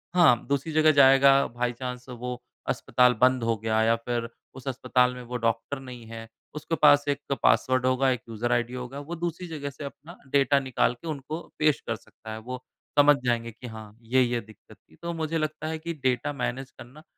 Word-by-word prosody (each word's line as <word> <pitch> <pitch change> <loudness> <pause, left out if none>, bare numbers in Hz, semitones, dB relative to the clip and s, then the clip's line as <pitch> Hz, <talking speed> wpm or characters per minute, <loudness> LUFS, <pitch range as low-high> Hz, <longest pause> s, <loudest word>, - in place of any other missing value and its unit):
हाँ 155 -10 +5
दूसरी 140 +3 -1
जगह 155 0 +5
जाएगा 135 -1 +7 0.2
बाय 120 +1 -2
चांस 125 0 -6
वो 125 0 -6 0.3
अस्पताल 125 -1 +3
बंद 130 -1 +4
हो 115 0 +1
गया 110 +1 0
या 115 +1 +4
फ़िर 115 0 -3 0.3
उस 130 +1 -11
अस्पताल 125 -1 +2
में 125 - -8
वो 125 +1 -4
डॉक्टर 115 +4 -1
नहीं 125 -3 -10
है। 115 0 -8 0.3
उसके 155 +2 -2
पास 145 -1 +6
एक 145 0 -1 0.2
पासवर्ड 130 0 +3
होगा 130 +1 +3
एक 125 -3 0
यूज़र 115 +2 -2
आईडी 120 0 0
होगा। 125 +2 -6
वो 160 +4 -6
दूसरी 175 +1 -4
जगह 150 -4 -5
से 140 +2 -10
अपना 145 +5 -10
डेटा 140 0 +4
निकाल 130 -2 +1
के 170 - -8
उनको 155 +2 -4 0.2
पेश 155 -1 +3
कर 115 - 0
सकता 110 0 -13
है 110 - -5
वो 125 +3 -7 0.4
समझ 145 0 +7
जाएँगे 115 -1 0
कि 120 +3 -11
हाँ 110 -2 -10
ये-ये 120 0 +1
दिक़्क़त 110 -1 -17
थी। 80 - -25
तो 170 - -3
मुझे 165 0 -2
लगता 155 0 -3
है 160 0 -3
कि 170 +1 -4
डेटा 130 +3 +1
मैनेज 130 0 -4
करना 130 +5 -14
130 Hz, 205 wpm, -26 LUFS, 120-145 Hz, 0.4 s, जाएगा